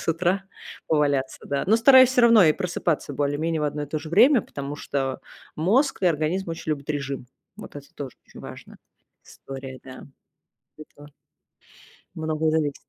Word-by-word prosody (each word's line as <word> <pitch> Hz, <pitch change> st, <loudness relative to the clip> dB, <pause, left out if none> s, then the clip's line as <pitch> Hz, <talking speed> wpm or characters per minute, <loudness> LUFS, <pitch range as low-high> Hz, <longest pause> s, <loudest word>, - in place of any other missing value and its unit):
с -, -, -9 dB
утра 180 Hz, +4 st, 0 dB, 0.4 s
поваляться, 145 Hz, -4 st, 0 dB
да. 140 Hz, -1 st, -2 dB
Но 210 Hz, -, +4 dB
стараюсь, 260 Hz, +2 st, +7 dB
всё 255 Hz, -1 st, +2 dB
равно, 230 Hz, -4 st, +7 dB
и 155 Hz, -, +5 dB
просыпаться 170 Hz, -3 st, -2 dB
более 145 Hz, +1 st, -1 dB
менее 160 Hz, 0 st, -1 dB
в 150 Hz, -, -1 dB
одно 150 Hz, 0 st, -3 dB
и -, -, -5 dB
то 155 Hz, +2 st, -3 dB
же 155 Hz, -, -9 dB
время, 235 Hz, -, +5 dB
потому 140 Hz, -5 st, -7 dB
что 135 Hz, -2 st, -3 dB, 0.4 s
мозг 225 Hz, -, +1 dB
и 185 Hz, -, +3 dB
организм 165 Hz, +3 st, 0 dB
очень 165 Hz, -1 st, -5 dB
любят 145 Hz, -2 st, -4 dB
режим. 140 Hz, -3 st, -4 dB, 0.3 s
Вот 215 Hz, -, -11 dB
это 145 Hz, -1 st, -10 dB
тоже 135 Hz, -3 st, -7 dB
очень -, -, -16 dB
важная -, -, -11 dB, 0.5 s
история, 135 Hz, -1 st, -10 dB
да. 130 Hz, 0 st, -11 dB, 0.7 s
Это 145 Hz, -1 st, -14 dB, 1.1 s
многое 160 Hz, 0 st, -1 dB
зависит. 155 Hz, -3 st, 0 dB
155 Hz, 170 wpm, -24 LUFS, 145-180 Hz, 1.1 s, стараюсь